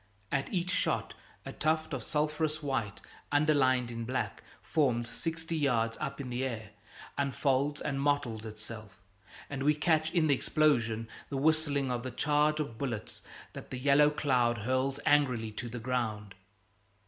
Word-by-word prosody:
At 140 -1 -1
each 180 -2 0
shot 200 - 0 0.3
a - - -6
tuft 160 0 0
of 130 - -2
sulphurous 150 +3 -1
white 125 -8 -2 0.3
underlined 135 -5 +3
in 115 0 -4
black 125 +3 -2 0.2
forms 125 -6 +1
sixty 165 +5 -3
yards 120 -7 +1
up 140 -2 -3
in 130 -3 -5
the 125 +2 -1
air, 110 -5 -4 0.5
unfolds 140 +1 +1
and 140 -2 -2
mottles 140 -6 0
itself, 110 -2 -8 0.5
and 135 -2 -5
we 150 +2 +4
catch 155 0 +2
in 170 -1 +2
the 145 - +4
explosion 120 -6 +2 0.2
the 140 - -2
whistling 145 -2 +2
of 120 -1 -1
the 130 - -4
charge 150 +4 +2
of 120 -7 -4
bullets 120 -6 -4 0.3
that - - -9
the 130 - -4
yellow 140 +3 +5
cloud 125 -5 +2
hurls 130 +2 0
angrily 125 -7 +3
to 120 +3 -5
the 120 - -6
ground. 110 -4 -2
135 Hz, 155 wpm, -31 LUFS, 120-150 Hz, 0.5 s, yellow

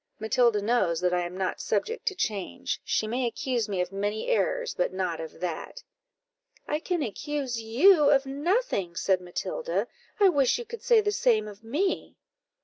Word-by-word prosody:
"Matilda 220 -1 +2
knows 205 -7 +2
that 180 0 +1
I 180 - +2
am 180 +1 -9
not 190 -1 -2
subject 460 +3 -2
to 390 - +1
change; 210 - -3
she - - 0
may 245 +3 -1
accuse 235 -1 -2
me 190 -3 0
of 180 +1 -3
many 205 - -2
errors, - - +1
but 180 - 0
not 185 -3 -2
of 160 0 -9
that." 180 - -5 0.8
"I 300 - 0
can 345 -1 -1
accuse 265 +1 -3
you 290 - +5
of 275 -1 +4
nothing," 280 - -1
said 185 +1 +1
Matilda; 475 - -3 0.3
"I 400 -2 +7
wish 280 - +3
you 480 - -6
could 465 +1 -8
say 465 -3 +5
the 415 0 0
same 225 - +2
of 210 +1 -11
me." 300 - -1
240 Hz, 175 wpm, -27 LUFS, -, 0.8 s, I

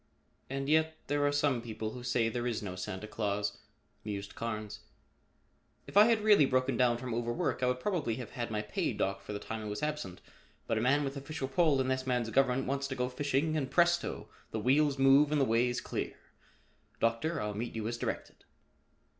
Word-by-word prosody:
"And 135 +1 -3
yet 160 +1 +2
there 145 0 0
are - - +2
some 145 -4 +1
people 110 -2 -5
who 125 - -8
say 120 -2 +1
there 120 +2 -2
is 115 -3 -2
no 95 -2 -5
Santa 95 +2 -5
Claus," 105 -1 -2 0.4
mused 100 -1 -5
Carnes. 110 -2 -4 1.1
"If - - -12
I 205 +1 +9
had 225 -2 +3
really 205 -10 +6
broken 130 0 +1
down 120 0 +3
from 125 -1 -5
overwork, 120 +2 -1
I 125 - +2
would 125 0 0
probably 150 - -1
have 125 -2 -7
had 120 -1 -4
my 105 -1 -2
pay 105 - -1
docked 100 0 -1
for 100 - -8
the 105 - -2
time 110 +2 -5
I - - -6
was 105 +3 -4
absent, 150 -12 -3 0.5
but 110 - 0
a - - -1
man 140 +5 +3
with 140 0 -3
official 140 0 -4
pull 140 +1 +3
in 130 - +1
this 130 0 -1
man's 120 -3 0
government 135 +1 +2
wants 140 +1 -1
to 135 - -4
go 125 0 -1
fishing 145 +4 0
and 140 -4 -1
presto! 175 +1 +2 0.2
the 110 - -3
wheels 140 +4 +3
move 135 +2 +5
and 150 - +2
the 135 - +4
way 115 +1 +3
is 120 0 -2
clear. - - -4 0.8
Doctor, 115 +9 0
I'll 105 0 -2
meet 115 +4 -4
you 110 -1 -2
as 120 0 -3
directed." - - -4
125 Hz, 210 wpm, -32 LUFS, 110-145 Hz, 1.1 s, I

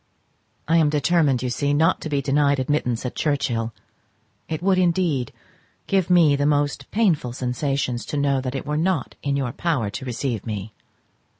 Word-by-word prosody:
I 165 +2 +4
am 155 -3 +4
determined, 150 -4 +2
you 125 - -1
see, 145 +3 0
not 165 +4 +2
to 155 - -5
be 140 -2 0
denied 140 +1 +2
admittance 130 -3 -1
at 125 - -3
Churchhill. 125 -6 -1 0.8
It 160 +1 -3
would 190 -1 +3
indeed 170 -8 +1 0.5
give 190 -3 +1
me 170 -5 +5
most 145 0 0
painful 170 - +1
sensations 125 0 -2
to 150 - -3
know 140 -2 +1
that 130 0 -4
it 135 - -4
were 150 +1 -1
not 165 -4 0
in 140 -1 -1
your 130 -3 -1
power 135 -8 -1
to 130 - -6
receive 120 -3 -3
me. 110 -1 -5
145 Hz, 170 wpm, -23 LUFS, 125-160 Hz, 0.8 s, me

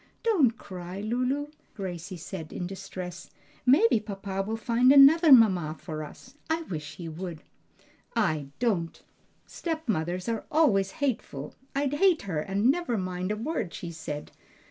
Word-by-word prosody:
"Don't 310 - +3
cry, 180 0 -8
Lulu," 255 +7 -1 0.3
Gracie 185 -2 -5
said 160 -1 -7
in 180 - -4
distress, 185 -2 -7 0.4
"maybe 290 - +5
papa 195 -2 -4
will 220 +3 -3
find 240 +3 +3
another 290 +4 +8
mamma 185 - +6
for 155 -3 -5
us. 255 - -12 0.2
I 325 +1 0
wish 155 - -6
he 170 - -7
would." 165 0 -6 0.7
"I 155 -11 +1
don't! 195 -9 -1 0.5
stepmothers 190 - -3
are 230 -2 -2
always 205 -12 +3
hateful! 150 - -3 0.2
I'd 280 0 0
hate 360 +2 +3
her 180 -6 -2
and 200 - +2
never 305 -7 -1
mind 185 0 -3
a - - 0
word 225 - -3
she 170 - -6
said. 150 -2 -6
200 Hz, 145 wpm, -28 LUFS, 175-260 Hz, 0.7 s, another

